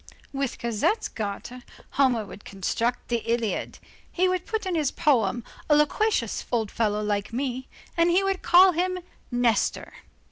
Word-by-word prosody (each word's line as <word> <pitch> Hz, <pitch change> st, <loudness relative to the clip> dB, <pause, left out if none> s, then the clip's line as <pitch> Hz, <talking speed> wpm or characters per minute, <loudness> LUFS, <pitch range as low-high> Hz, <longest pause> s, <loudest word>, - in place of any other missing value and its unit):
With 275 Hz, -2 st, -2 dB
Cosette's 235 Hz, -, 0 dB
garter, 220 Hz, +4 st, -6 dB, 0.3 s
Homer 250 Hz, -6 st, +2 dB
would 200 Hz, +1 st, -11 dB
construct 230 Hz, +5 st, -2 dB
the 240 Hz, -, +2 dB
Iliad. 230 Hz, -2 st, -2 dB, 0.3 s
He 370 Hz, +1 st, +2 dB
would 365 Hz, -1 st, -1 dB
put 440 Hz, -2 st, -2 dB
in 370 Hz, -, -1 dB
his 305 Hz, -5 st, +1 dB
poem, 240 Hz, -, +1 dB, 0.3 s
a 295 Hz, -, +6 dB
loquacious 300 Hz, -, +1 dB
old 225 Hz, -4 st, 0 dB
fellow, 210 Hz, -2 st, 0 dB
like 205 Hz, 0 st, -1 dB
me, 255 Hz, +1 st, -3 dB, 0.3 s
and 335 Hz, 0 st, +3 dB
he 365 Hz, +3 st, +3 dB
would 390 Hz, -1 st, -1 dB
call 365 Hz, +2 st, +7 dB
him 365 Hz, +2 st, -1 dB, 0.3 s
Nestor. 240 Hz, -3 st, 0 dB
250 Hz, 150 wpm, -26 LUFS, 225-345 Hz, 0.3 s, call